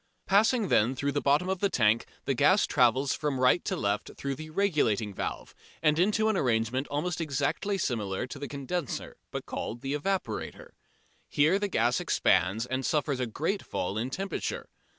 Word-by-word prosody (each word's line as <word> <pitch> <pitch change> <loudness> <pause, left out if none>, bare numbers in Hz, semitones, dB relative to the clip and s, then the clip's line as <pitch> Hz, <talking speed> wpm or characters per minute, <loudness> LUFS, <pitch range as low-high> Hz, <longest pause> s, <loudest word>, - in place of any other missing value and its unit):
Passing 215 +2 +3
then 120 +5 +3
through 140 +2 -1
the 145 - -1
bottom 145 +6 +2
of 190 -1 -1
the 200 - +2
tank 110 - +2 0.2
the 135 - +1
gas 185 - +4
travels 130 +1 +3
from 145 -3 -2
right 130 +7 +4
to - - -1
left 100 +1 -1
through 140 0 -3
the 155 +3 -8
"regulating 150 - +1
valve" - - -5 0.3
and 155 0 +3
into 215 +4 +3
an 220 - +2
arrangement 125 - 0
almost 160 +4 -2
exactly 155 +7 -1
similar 110 - -2
to 130 +2 -8
the 145 - -5
condenser 140 +2 -4
but - - -5
called 120 - -5
the 135 +1 -3
evaporator. 195 - -3 0.6
Here 155 +7 +3
the 205 - 0
gas 120 - +1
expands 100 - +2
and 130 +1 -2
suffers 145 -2 0
a 125 - -1
great 165 - -2
fall 95 - -3
in 115 +4 -2
temperature. 195 +8 -4
140 Hz, 175 wpm, -29 LUFS, 120-180 Hz, 0.6 s, gas